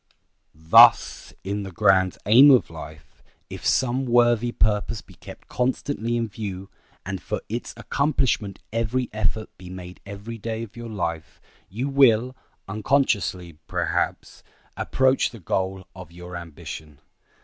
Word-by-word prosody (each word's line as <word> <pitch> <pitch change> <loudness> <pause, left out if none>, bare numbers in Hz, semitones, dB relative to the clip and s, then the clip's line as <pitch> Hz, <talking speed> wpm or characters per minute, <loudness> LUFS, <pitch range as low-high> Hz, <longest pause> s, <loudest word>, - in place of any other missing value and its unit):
Thus, 80 +1 +5
in 100 +2 -3
the 95 -1 -7
grand 95 -2 +3
aim 125 +8 +8
of 130 -10 +4
life, 80 -2 -11 0.3
if - - -8
some 130 +1 +1
worthy 120 -1 +3
purpose 105 0 0
be - - -16
kept - - -13
constantly 125 -1 -1
in 115 -1 -1
view, 100 -2 -7 0.3
and - - -4
for - - -3
its 120 +3 -4
accomplishment 130 -9 0 0.2
every 115 +2 -1
effort 110 0 -2
be 90 -1 -10
made 90 0 -10
every 100 +3 -8
day 115 +1 -4
of 110 -1 -11
your 120 -1 -8
life, 85 -6 -4 0.3
you 120 +8 -3
will, 130 -3 +4 0.3
unconsciously, 100 - 0
perhaps, - - -2 0.3
approach 130 0 +1
the 115 - -12
goal 95 +1 -2
of 90 -3 -11
your 90 +1 -10
ambition. 80 -3 -9
105 Hz, 135 wpm, -24 LUFS, 95-120 Hz, 0.3 s, aim